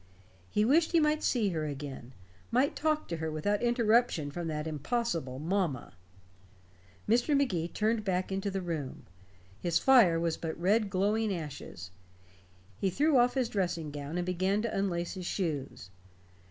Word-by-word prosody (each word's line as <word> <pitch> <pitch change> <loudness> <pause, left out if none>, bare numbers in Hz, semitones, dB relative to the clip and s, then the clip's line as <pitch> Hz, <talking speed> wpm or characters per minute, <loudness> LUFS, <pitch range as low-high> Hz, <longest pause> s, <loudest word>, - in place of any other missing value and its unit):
He 210 - +2
wished 320 +8 +3
he 335 - +6
might 305 0 +2
see 225 -5 +1
her 160 -4 -2
again; 135 -3 -7 0.4
might 255 +4 +2
talk 310 0 0
to 170 - -3
her 160 0 -3
without 180 +7 -1
interruption 235 - +2
from 170 +2 -4
that 150 -1 -3
impossible 160 - -2
"mamma." 165 -3 -1 1.1
Mr. 245 +6 +3
Magee 185 -13 0
turned 215 +4 0
back 185 -1 -1
into 195 +1 -1
the 195 -1 -3
room. 155 -6 -5 0.5
His 170 +3 +1
fire 225 -11 +5
was 165 -1 -1
but 160 -1 -5
red 205 +4 +2
glowing 205 +3 +1
ashes. 145 - -6 0.9
He 195 - +1
threw 290 - +3
off 245 +1 +3
his 255 -3 +1
dressing 175 -7 -2
gown, 145 +3 -5
and 175 - -1
began 185 +4 0
to 235 - -2
unlace 175 -3 -1
his 185 -3 -6
shoes. 145 - -3
185 Hz, 155 wpm, -30 LUFS, 160-230 Hz, 1.1 s, he